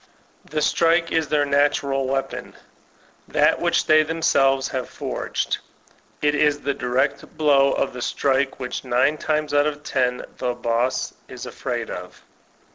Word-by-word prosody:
The 150 0 -2
strike 170 +1 +2
is 160 -2 +1
their 145 0 +2
natural 140 -1 +1
weapon, 135 0 -3 0.7
that - - +2
which - - +2
they 155 0 +6
them 160 +1 -3
selves 135 -2 +3
forged. 130 -2 -3 0.6
It 150 0 +3
is 150 -1 +2
the 140 - -1
direct 125 +1 -1
blow 140 -3 +4
of - - -1
the 125 - -7
strike 135 +2 0
which 125 -1 -4
nine 130 +4 +2
times 155 -1 -1
out 145 +1 +4
of 150 0 -4
ten 125 -3 0
the 125 -1 -1
boss 120 +2 -1
is - - -8
afraid - - -4
of. - - -8
140 Hz, 145 wpm, -23 LUFS, 130-150 Hz, 0.7 s, they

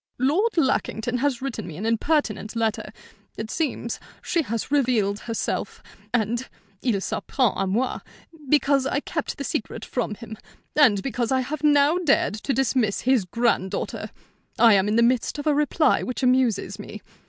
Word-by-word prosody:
"Lord 340 - +1
Lackington 250 -4 0
has 265 -2 0
written 230 -6 -4
me 155 - -8
an 205 - -4
impertinent 230 -2 0
letter. 225 -2 -1 0.5
It 220 0 -5
seems 265 -7 -2 0.2
she 340 - +1
has 230 -2 -4
revealed 235 -8 +2
herself, 230 -1 -3 0.3
and 235 +2 -1 0.3
il 235 -6 +1
s'en - - -3
prend 250 -7 +2
à 195 -1 -1
moi, 240 +7 0 0.5
because 280 -2 +3
I 280 - 0
kept 320 -1 -4
the 280 - -4
secret 225 -3 -4
from 235 -4 -2
him, 220 0 -10 0.4
and 225 -10 +5
because 245 -3 -2
I 260 0 +3
have 305 +5 -5
now 295 +3 +4
dared 300 -10 +2
to 215 +6 -3
dismiss 255 -5 +1
his 255 -6 +2
granddaughter. 210 -2 -1 0.5
I 230 -2 +7
am 195 0 +3
in 210 - +1
the 235 - +5
midst 245 +4 +1
of 290 - -5
a 305 - +3
reply 300 0 +2
which 255 +1 -4
amuses 250 -6 +2
me. 210 0 -9
245 Hz, 165 wpm, -24 LUFS, 220-280 Hz, 0.5 s, I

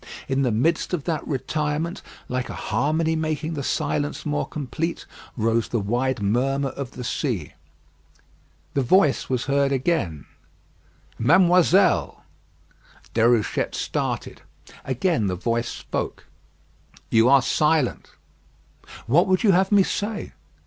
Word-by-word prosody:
In 135 0 0
the 125 -3 +1
midst 160 +10 +1
of 155 - -6
that 165 -1 -3
retirement, 150 +4 -2 0.3
like 125 0 -3
a - - -6
harmony 155 +8 0
making 155 0 -2
the 145 - -3
silence 145 +2 -2
more 150 -1 -1
complete, 155 +4 -4 0.3
rose 115 0 +1
the 120 - -1
wide 120 +3 -1
murmur 135 +6 +1
of 135 -2 -7
the 125 - -7
sea. 115 - -2 1.2
The 140 - +1
voice 150 +2 +3
was 125 -1 -1
heard 140 0 +1
again. 130 - -1 0.9
"Mademoiselle!" 175 - +4 0.9
Déruchette 115 -1 +2
started. - - -3 0.4
Again 135 - 0
the 90 - -1
voice 115 +5 -1
spoke. - - -5 0.9
"You 115 +2 +5
are 135 -1 +6
silent." 150 -4 +1 1.0
"What 155 +11 +3
would 185 +2 +2
you 210 - +5
have 190 +2 +2
me 200 -2 +6
say?" 205 +3 -3
140 Hz, 120 wpm, -23 LUFS, 120-165 Hz, 1.2 s, are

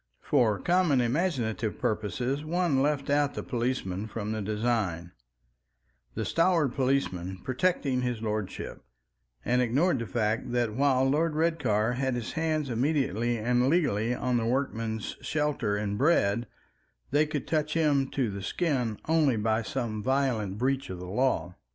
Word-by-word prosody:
For 110 -4 +3
common 175 - +2
imaginative 120 - 0
purposes 120 +7 -1
one 165 -4 +1
left 145 -1 0
out 145 0 +2
the - - -4
policeman 115 -6 -2
from 110 -1 -4
the 110 -1 -2
design, 105 -5 -1 1.0
the - - -2
stalwart 165 -4 +2
policeman 120 -9 -1
protecting 130 -1 0
his 125 -2 -2
lordship, 110 -3 -4 0.6
and 125 +1 +2
ignored 135 +6 +2
the 115 - -4
fact 115 +2 -1
that 120 -3 +1
while 135 +1 +3
Lord 155 +3 +1
Redcar 130 -9 +1
had 130 0 -1
his 120 -2 -4
hands 155 -2 -1
immediately 120 - 0
and 125 +3 +2
legally 125 - +1
on 125 -1 0
the 115 - 0
workman's 115 -4 -2
shelter 150 -9 0
and 105 0 -2
bread, 120 -6 +2 0.6
they 150 +2 +3
could 150 -2 -3
touch 150 0 -1
him 145 -4 +2
to 125 -6 -1
the 100 0 -6
skin 125 - -1
only 155 -5 +3
by 110 +1 +1
some 115 -2 -3
violent 125 -6 0
breach 135 +3 0
of 95 - -5
the 90 - -7
law. 90 -4 0
125 Hz, 145 wpm, -28 LUFS, 110-145 Hz, 1.0 s, For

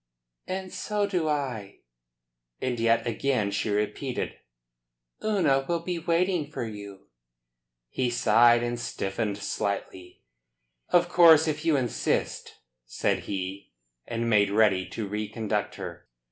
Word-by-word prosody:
"And 185 0 -4
so 210 -1 -1
do 180 -5 -1
I." 125 -9 -3 0.8
And 125 -2 -2
yet 115 0 +2
again 120 -3 0
she 110 - -1
repeated: 105 +6 -2 0.9
"Una 165 -11 +2
will 170 -1 0
be 175 0 -3
waiting 170 -1 +1
for 150 - -4
you." 100 -2 -9 0.8
He 125 - -1
sighed, 120 0 +5
and 120 0 -2
stiffened 100 -2 -3
slightly. 100 -3 -4 0.7
"Of 175 0 +4
course 165 -3 +7
if 155 0 -2
you 160 -2 +4
insist," 125 -3 -1 0.3
said - - -1
he, 95 0 -5 0.3
and 115 0 -2
made 105 -3 +4
ready 100 -3 +3
to 110 -3 -5
reconduct 105 +1 -2
her. - - -8
120 Hz, 120 wpm, -27 LUFS, 105-160 Hz, 0.9 s, course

